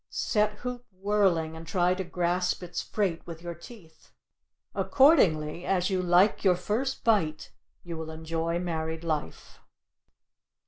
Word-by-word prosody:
Set 210 Hz, -1 st, 0 dB
hoop 250 Hz, 0 st, -5 dB
whirling 185 Hz, -5 st, +1 dB
and 165 Hz, 0 st, -10 dB
try 180 Hz, -1 st, +2 dB
to 190 Hz, +1 st, -3 dB
grasp 180 Hz, +1 st, -1 dB
its 175 Hz, 0 st, -4 dB
freight 190 Hz, -6 st, -1 dB
with 165 Hz, 0 st, -8 dB
your 175 Hz, 0 st, -4 dB
teeth. 170 Hz, -1 st, -15 dB, 0.6 s
Accordingly 175 Hz, -, +3 dB
as 185 Hz, 0 st, 0 dB
you 185 Hz, -1 st, +1 dB
like 180 Hz, +3 st, +3 dB
your 185 Hz, -3 st, +5 dB
first 220 Hz, +9 st, -2 dB
bite 165 Hz, -9 st, +1 dB, 0.3 s
will 160 Hz, -2 st, -5 dB
you -, -, -8 dB
enjoy 165 Hz, +1 st, -2 dB
married 160 Hz, -2 st, -3 dB
life. 155 Hz, -3 st, -4 dB
175 Hz, 135 wpm, -28 LUFS, 165-200 Hz, 0.6 s, your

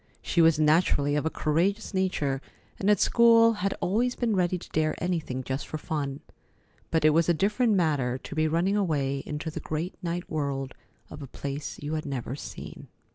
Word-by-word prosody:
She 170 Hz, -, +2 dB
was 165 Hz, -2 st, +5 dB
naturally 150 Hz, -2 st, +3 dB
of 150 Hz, +2 st, 0 dB
a -, -, +1 dB
courageous 180 Hz, +10 st, 0 dB
nature, 150 Hz, -8 st, 0 dB, 0.4 s
and 200 Hz, -, +1 dB
at 210 Hz, -, +4 dB
school 230 Hz, -1 st, +5 dB
had 195 Hz, -2 st, -2 dB
always 235 Hz, +7 st, +1 dB
been 230 Hz, -4 st, 0 dB
ready 180 Hz, -1 st, +1 dB
to -, -, -12 dB
dare 155 Hz, 0 st, 0 dB
anything 160 Hz, -8 st, -2 dB
just 130 Hz, +2 st, -4 dB
for 155 Hz, -, -4 dB
fun, 145 Hz, -3 st, -4 dB, 0.7 s
but 160 Hz, -2 st, +1 dB
it 155 Hz, -, +7 dB
was 165 Hz, +2 st, +2 dB
a 170 Hz, -, +4 dB
different 210 Hz, +6 st, +2 dB
matter 145 Hz, -9 st, +1 dB
to 135 Hz, -, -9 dB
be 155 Hz, 0 st, +1 dB
running 170 Hz, +5 st, +1 dB
away 140 Hz, -8 st, 0 dB
into 155 Hz, +2 st, -4 dB
the -, -, -5 dB
great 160 Hz, +4 st, -3 dB
night 175 Hz, 0 st, -3 dB
world 140 Hz, -3 st, -3 dB, 0.4 s
of 150 Hz, -, -9 dB
a 140 Hz, -, -7 dB
place 140 Hz, +2 st, -5 dB
you 150 Hz, +2 st, -3 dB
had 155 Hz, -1 st, -3 dB
never 130 Hz, -2 st, -4 dB
seen. -, -, -9 dB
160 Hz, 190 wpm, -27 LUFS, 145-185 Hz, 0.7 s, it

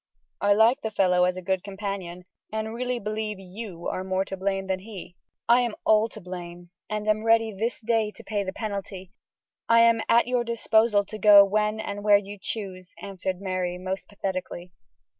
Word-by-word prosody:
I 205 Hz, 0 st, +4 dB
like 225 Hz, +4 st, +4 dB
the 220 Hz, -, -2 dB
fellow 180 Hz, -4 st, +3 dB
as 180 Hz, 0 st, -1 dB
a 185 Hz, -, -7 dB
good 190 Hz, 0 st, -1 dB
companion, 195 Hz, -3 st, -6 dB, 0.3 s
and 220 Hz, +1 st, -3 dB
really 250 Hz, +1 st, -2 dB
believe 215 Hz, -2 st, -4 dB
you 190 Hz, -2 st, -8 dB
are 185 Hz, -, -3 dB
more 190 Hz, 0 st, -1 dB
to 195 Hz, -, -5 dB
blame 195 Hz, 0 st, -2 dB
than 190 Hz, -1 st, -2 dB
he." 190 Hz, -3 st, -10 dB, 0.3 s
"I 240 Hz, +2 st, +6 dB
am 235 Hz, -3 st, -2 dB
all 220 Hz, +1 st, +4 dB
to 215 Hz, -, -11 dB
blame, 175 Hz, -2 st, -9 dB, 0.2 s
and 210 Hz, 0 st, -3 dB
am 215 Hz, 0 st, +1 dB
ready 225 Hz, -1 st, +3 dB
this 225 Hz, +5 st, -2 dB
day 225 Hz, -1 st, +1 dB
to -, -, -13 dB
pay 205 Hz, -2 st, -2 dB
the 190 Hz, -, -4 dB
penalty. 195 Hz, -3 st, -6 dB, 0.6 s
I 230 Hz, 0 st, +6 dB
am 230 Hz, -1 st, +4 dB
at 235 Hz, +1 st, +5 dB
your 245 Hz, 0 st, 0 dB
disposal 225 Hz, -2 st, +2 dB
to 215 Hz, +2 st, -8 dB
go 205 Hz, -1 st, +8 dB
when 210 Hz, +2 st, 0 dB
and 205 Hz, -1 st, -5 dB
where 205 Hz, -1 st, +6 dB
you 200 Hz, 0 st, -8 dB
choose," 185 Hz, -4 st, -6 dB
answered 190 Hz, -2 st, -4 dB
Mary, 185 Hz, -2 st, -2 dB
most 185 Hz, +1 st, -5 dB
pathetically. 185 Hz, -3 st, -5 dB
205 Hz, 190 wpm, -26 LUFS, 185-220 Hz, 0.6 s, go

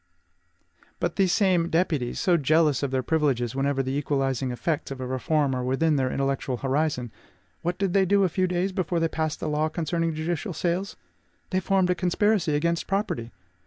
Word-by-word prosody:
But -, -, -1 dB
these 190 Hz, -2 st, +2 dB
same 185 Hz, -5 st, +2 dB
deputies, 160 Hz, -8 st, 0 dB
so 180 Hz, -, +3 dB
jealous 155 Hz, -2 st, +3 dB
of 140 Hz, -, -1 dB
their 130 Hz, 0 st, -1 dB
privileges 135 Hz, -6 st, +1 dB
whenever 135 Hz, 0 st, 0 dB
the 130 Hz, +1 st, -2 dB
equalizing 135 Hz, -2 st, 0 dB
effects 145 Hz, +5 st, -2 dB
of 135 Hz, -1 st, -6 dB
a 130 Hz, -, -4 dB
reform 135 Hz, +2 st, 0 dB
are 125 Hz, -1 st, -2 dB
within 150 Hz, +5 st, +1 dB
their 130 Hz, -2 st, +1 dB
intellectual 135 Hz, -2 st, -1 dB
horizon, 135 Hz, -2 st, -1 dB, 0.5 s
what 175 Hz, +1 st, -2 dB
did 195 Hz, -2 st, 0 dB
they 195 Hz, -1 st, +4 dB
do 200 Hz, +1 st, +4 dB
a -, -, +4 dB
few 185 Hz, +2 st, 0 dB
days 180 Hz, +2 st, 0 dB
before 175 Hz, -2 st, -1 dB
they 165 Hz, -, +2 dB
passed 160 Hz, -1 st, -2 dB
the -, -, -3 dB
law 150 Hz, +1 st, 0 dB
concerning 165 Hz, 0 st, -1 dB
judicial 170 Hz, +4 st, -2 dB
sales? 180 Hz, +4 st, -2 dB, 0.6 s
They 185 Hz, -, +2 dB
formed 190 Hz, -1 st, +2 dB
a -, -, +4 dB
conspiracy 180 Hz, -2 st, +1 dB
against 170 Hz, +3 st, 0 dB
property! 190 Hz, -, -1 dB
160 Hz, 185 wpm, -26 LUFS, 135-180 Hz, 0.6 s, they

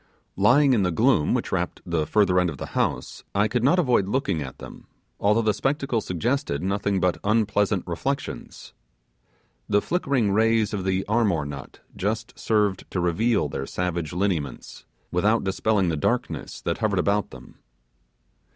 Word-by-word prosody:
Lying 130 Hz, +8 st, +5 dB
in 115 Hz, -, +3 dB
the 90 Hz, -, +1 dB
gloom 105 Hz, -, +2 dB
which -, -, -2 dB
wrapped -, -, -2 dB
the 80 Hz, -3 st, -1 dB
further 95 Hz, -2 st, +3 dB
end 90 Hz, -1 st, +2 dB
of 75 Hz, -, -6 dB
the -, -, -5 dB
house, -, -, -2 dB
I 105 Hz, +2 st, +3 dB
could 115 Hz, +2 st, -1 dB
not 145 Hz, +8 st, +4 dB
avoid 125 Hz, -, +2 dB
looking 100 Hz, -, 0 dB
at 65 Hz, -3 st, -7 dB
them, -, -, -11 dB, 0.3 s
although 105 Hz, +3 st, +3 dB
the 110 Hz, -1 st, +2 dB
spectacle 135 Hz, 0 st, -1 dB
suggested 110 Hz, -, -2 dB
nothing 100 Hz, 0 st, 0 dB
but 90 Hz, 0 st, +1 dB
unpleasant 105 Hz, -2 st, +1 dB
reflection. 135 Hz, +11 st, -3 dB, 1.2 s
The 105 Hz, -, +4 dB
flickering 135 Hz, -, 0 dB
rays 110 Hz, +1 st, +2 dB
of 95 Hz, -2 st, -3 dB
the 95 Hz, 0 st, 0 dB
'armor' 105 Hz, -8 st, +1 dB
nut 70 Hz, -2 st, -9 dB
just 110 Hz, +4 st, -2 dB
served 105 Hz, -4 st, 0 dB
to 90 Hz, -, -2 dB
reveal 100 Hz, +7 st, +1 dB
their -, -, -5 dB
savage 85 Hz, -3 st, -2 dB
lineaments, 85 Hz, -8 st, -3 dB, 0.3 s
without 105 Hz, +6 st, +2 dB
dispelling 95 Hz, 0 st, +1 dB
the 80 Hz, -, -1 dB
darkness -, -, -2 dB
that 85 Hz, -, -2 dB
hovered 110 Hz, -3 st, 0 dB
about 100 Hz, +3 st, +1 dB
them. -, -, -14 dB
100 Hz, 160 wpm, -24 LUFS, 90-115 Hz, 1.2 s, Lying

